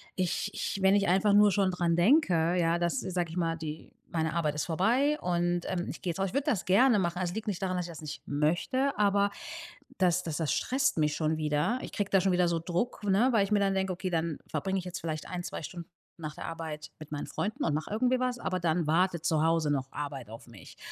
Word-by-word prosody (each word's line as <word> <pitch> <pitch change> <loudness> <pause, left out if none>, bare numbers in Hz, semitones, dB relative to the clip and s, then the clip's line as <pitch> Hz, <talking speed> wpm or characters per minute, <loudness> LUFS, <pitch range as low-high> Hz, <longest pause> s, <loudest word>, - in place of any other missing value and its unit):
ich 180 +1 -1
ich 200 - -3
wenn 190 +1 +5
ich 200 -1 +2
einfach 195 +3 +3
nur 205 0 +6
schon 195 -1 +2
dran 175 -2 +1
denke, 175 - +3
ja, 170 0 +2
dass, 175 +9 0
sage 180 -3 -2
ich 170 - -7
mal, 165 -1 0
die 155 -1 -7 0.2
meine 160 -1 -1
Arbeit 155 -3 0
ist 150 - -1
vorbei 245 - +2
und, 175 0 0
ähm, 180 -2 -2
ich - - -7
gehe 180 - -1
jetzt 170 - -7
raus, 195 - +1
ich - - -12
würde 280 +2 0
das 215 -10 0
gerne 215 +5 +5
machen. 175 -2 -1
Es 175 -1 -2
liegt 220 +2 -4
nicht 200 -3 -2
daran, 185 -1 -1
dass 180 -1 -2
ich - - -8
das 160 -2 -10
nicht 150 - -7
möchte, 175 - 0
aber 200 -1 +3 0.7
das 180 -1 +3
das 160 -4 -4
das 160 -3 0
stresst 270 - +1
mich 150 -1 +2
schon 155 0 0
wieder. 150 +11 0
Ich - - -7
kriege 205 -2 -2
da 195 - +5
schon 190 0 +2
wieder 180 0 +3
so 170 -1 0
Druck, 180 +8 -2
ne, 205 +6 +3
weil 220 -4 +4
ich 195 - -4
mir 210 - +4
dann 195 -1 +2
denke: 190 0 0
„Okay, 185 +1 -4
dann 165 -2 -1
verbringe 195 0 -2
ich 185 - -4
jetzt 180 0 -5
vielleicht 155 -2 -4
1, 180 -1 -4
2 - - -6
Stunden 170 +2 -8 0.3
nach 155 -2 -6
der - - -7
Arbeit 160 -2 -6
mit 155 -1 -11
meinen 145 -1 -4
Freunden 210 +2 -3
und 150 - +1
mache 155 +1 -2
irgendwie 250 +4 +2
was, 250 -1 0
aber 185 -5 -2
dann 170 0 +1
wartet 170 0 +1
zu 155 -1 +2
Hause 165 -2 +2
noch 135 -2 -2
Arbeit 140 -6 -5
auf 115 - -10
mich.” 115 -4 -14
175 Hz, 250 wpm, -29 LUFS, 160-200 Hz, 0.7 s, nur